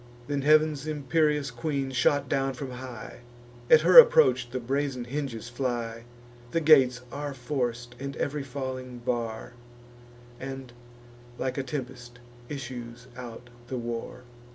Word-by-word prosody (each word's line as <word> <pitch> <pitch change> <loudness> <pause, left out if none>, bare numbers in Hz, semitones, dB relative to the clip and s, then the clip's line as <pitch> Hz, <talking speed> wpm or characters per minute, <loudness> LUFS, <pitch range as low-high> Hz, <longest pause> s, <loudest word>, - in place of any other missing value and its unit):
Then 145 0 -2
heav'n's 155 0 +3
imperious 150 -1 +1
queen 140 -4 -2
shot 140 +2 +2
down 135 0 0
from 130 0 -6
high: 125 -3 -8 0.5
At 155 - +8
her 180 +7 +10
approach 125 - +6
the 130 +1 -3
brazen 135 +1 -2
hinges 125 -3 -4
fly; 120 -2 -3 0.4
The 165 - 0
gates 135 -6 +5
are 145 -1 -5
forc'd, 120 -3 -3
and 140 +1 -5
ev'ry 145 +1 -2
falling 130 -2 -5
bar; 115 -1 -3 0.9
And, 135 -2 -7 0.6
like 130 +1 -2
a - - +1
tempest, 125 -2 -6 0.3
issues 125 -3 -7
out 120 -1 -9 0.2
the 130 - -4
war. 120 +1 -5
130 Hz, 130 wpm, -27 LUFS, 120-140 Hz, 0.9 s, her